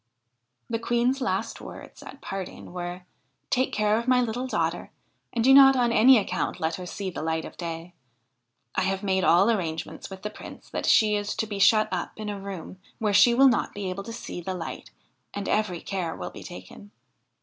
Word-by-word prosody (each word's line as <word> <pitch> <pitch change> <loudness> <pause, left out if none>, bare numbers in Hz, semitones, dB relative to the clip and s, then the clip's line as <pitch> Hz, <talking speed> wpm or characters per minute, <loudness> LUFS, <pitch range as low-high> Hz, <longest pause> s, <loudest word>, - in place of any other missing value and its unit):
The 230 -1 -2
Queen's 240 +3 +1
last 260 - -2
words - - -11
at 280 - -11
parting 190 -2 -7
were: 180 0 -5 0.2
' - - -48
Take 255 +1 +1
care 210 +1 +2
of 235 - -6
my 255 0 +4
little 245 +1 -1
daughter, - - -1 0.4
and 230 - -1
do 265 +2 +6
not 270 0 +9
on 240 -2 +2
any 245 +3 +7
account 210 - -2
let 160 +1 -1
her 180 -1 -7
see 190 +1 -5
the - - -6
light 160 0 -1
of - - -10
day. 170 0 -6 0.8
I - - 0
have 190 +1 -1
made 190 -1 +1
all 190 +6 +5
arrangements 165 -7 -3
with 190 0 -10
the 210 - -4
Prince - - -12
that - - -3
she 215 -1 +5
is 205 0 -2
to - - -1
be 205 -2 -5
shut 215 +2 +5
up 180 -2 -3
in 215 -1 -5
a 205 -1 -4
room 190 -1 -8 0.2
where 210 -2 0
she 235 +4 +6
will 270 +2 +7
not 245 - +1
be 200 -2 -3
able 195 +2 -5
to 230 - -6
see 180 - -7
the 185 +2 -4
light, 170 -2 -7 0.5
and 200 -1 -4
every 205 -5 0
care 180 -4 -3
will 90 - -6
be - - -10
taken.' 90 - -11
205 Hz, 210 wpm, -26 LUFS, 180-230 Hz, 0.8 s, not